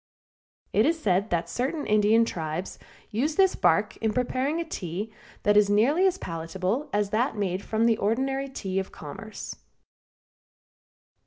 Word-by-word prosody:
It - - +4
is 330 0 +1
said 200 - +1
that 170 -1 0
certain 280 +5 -2
Indian 215 +2 +4
tribes 160 -2 -4 0.3
use 275 +8 0
this 380 -1 +4
bark - - +2
in 220 -1 -1
preparing 255 +6 0
a 335 - -2
tea 200 - -5 0.3
that 205 0 +4
is 205 -1 +5
nearly 275 - +4
as 375 0 0
palatable 185 - -3
as 205 -1 0
that 225 +1 +1
made 190 -2 -1
from 220 +1 +1
the 230 -2 +4
ordinary 270 +6 0
tea 195 -7 -3
of 190 - -5
commerce. 195 +9 -8
220 Hz, 150 wpm, -27 LUFS, 195-270 Hz, 0.3 s, is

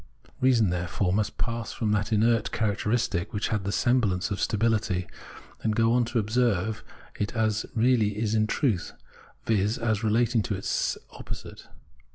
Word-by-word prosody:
Reason, 120 -7 +3
there 90 0 -2
fore, 90 +1 0
must 105 +1 -1
pass 115 -1 -3
from 110 -3 -1
that 105 +1 0
inert 115 +1 +2
characteristic 105 -3 -1
which 105 0 -1
had 105 -3 -1
the 100 - -1
semblance 105 -5 +1
of 100 - -2
stability, 110 -4 +1 0.6
and 110 -1 0
go 115 +1 +3
on 120 -1 +3
to 120 +1 -3
observe 110 -1 0 0.4
it 105 +4 -2
as 110 -1 +1
it - - -19
really 110 -3 +2
is 110 0 0
in 110 -1 +2
truth, 110 - 0 0.5
viz. 105 0 +1
as 110 -1 -1
relating 115 +2 +2
itself - - -4
to 105 - 0
its 95 - -1
opposite. - - -9
110 Hz, 170 wpm, -27 LUFS, 105-115 Hz, 0.6 s, Reason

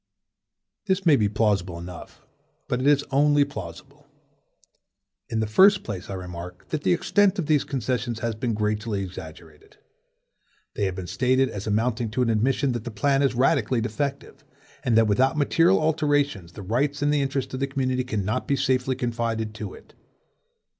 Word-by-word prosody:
This 190 -1 0
may 160 -4 +6
be 105 -6 +2
plausible 100 -5 0
enough, 85 0 -10 0.4
but 125 - -1
it 135 - +1
is 145 -1 +4
only 145 +1 +4
plausible. 90 -12 -10 1.2
In 110 - -1
the - - +1
first 190 - +5
place 100 -1 -6
I 100 - -4
remark, 90 -1 -8
that 155 - -2
the - - +1
extent 200 +2 +2
of 180 - -1
these 150 -2 +2
concessions 125 -2 -2
has 115 -1 -1
been 115 +1 -2
greatly 105 -1 -1
exaggerated. 80 -4 -11 1.0
They 100 - -1
have 95 -1 -2
been 95 -1 -5
stated 125 +9 +1
as 100 -1 -6
amounting 115 +2 0
to 125 +4 0
an 115 - +1
admission 130 +5 +1
that 120 -3 -3
the 120 - -5
plan 135 +6 +1
is 135 -3 +1
radically 125 -1 +2
defective, 135 +6 -4 0.4
and 115 -3 +2
that 115 - +5
without 130 +9 +2
material 165 +5 +3
alterations 145 - 0
the 100 - -9
rights 140 +8 -1
and 145 0 +2
the 145 - +2
interests 135 -1 -2
of 130 - -3
the 140 - 0
community 130 -2 -1
cannot 110 0 -2
be 140 - +2
safely 130 -1 0
confided 115 -3 -2
to 105 -3 -7
it. - - -17
120 Hz, 175 wpm, -25 LUFS, 105-140 Hz, 1.2 s, may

